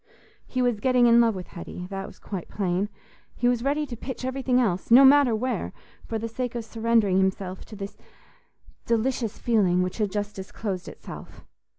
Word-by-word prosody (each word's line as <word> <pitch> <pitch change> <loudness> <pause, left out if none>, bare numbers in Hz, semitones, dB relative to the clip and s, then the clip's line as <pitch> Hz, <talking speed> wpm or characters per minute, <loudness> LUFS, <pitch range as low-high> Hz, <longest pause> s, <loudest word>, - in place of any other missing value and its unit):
He 255 -1 -1
was 240 -4 +1
getting 250 +1 +4
in 235 0 +7
love 230 -3 +3
with 185 -1 -7
Hetty—that 180 +2 -7
was - - -13
quite 190 -4 -6
plain. 195 0 -1 0.5
He 245 - +1
was 245 -1 +2
ready 290 +2 +1
to 255 -4 -7
pitch 255 +2 -6
everything 260 -1 +1
else—no 230 +4 +5
matter 270 -4 +6
where—for 230 -1 -4
the 225 +1 -3
sake 245 +1 -4
of 235 -2 -3
surrendering 225 -4 +2
himself 190 -1 -1
to 220 - -11
this 200 0 -7 0.9
delicious 235 -1 0
feeling 190 -6 +2
which 180 +4 -4
had 210 -3 0
just 205 0 -3
disclosed 190 -1 -5
itself. - - -10
225 Hz, 170 wpm, -26 LUFS, 195-245 Hz, 0.9 s, in